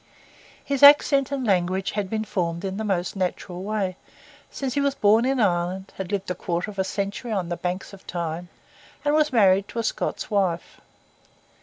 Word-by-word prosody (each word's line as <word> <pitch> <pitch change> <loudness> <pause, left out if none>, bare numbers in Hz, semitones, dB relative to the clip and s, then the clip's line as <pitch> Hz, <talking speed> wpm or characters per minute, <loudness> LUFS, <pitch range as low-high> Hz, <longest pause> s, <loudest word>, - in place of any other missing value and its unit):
His 280 -2 -1
accent 285 -1 +7
and 270 -2 -2
language 190 -1 +1
had 200 -2 -3
been 220 +1 -2
formed 170 -2 -2
in 190 0 -3
the 220 - -3
most 190 -3 -1
natural 180 -1 -3
way, 200 -3 -2 0.5
since 265 -3 -4
he 285 - +1
was 280 -1 +1
born 215 +3 +4
in 265 0 +1
Ireland, 185 -1 0
had 190 -1 -5
lived 195 -2 -2
a - - +1
quarter 175 +3 -3
of 200 - -10
a - - +3
century 200 +5 -4
on 190 -5 -1
the 175 - -1
banks 180 +2 -4
of 195 - -14
Tyne, 170 0 -4 0.6
and 290 - +3
was 305 0 +3
married 200 -4 +4
to - - -10
a 230 - 0
Scots 220 - -3
wife. 185 -5 -1
195 Hz, 190 wpm, -24 LUFS, 180-225 Hz, 0.6 s, accent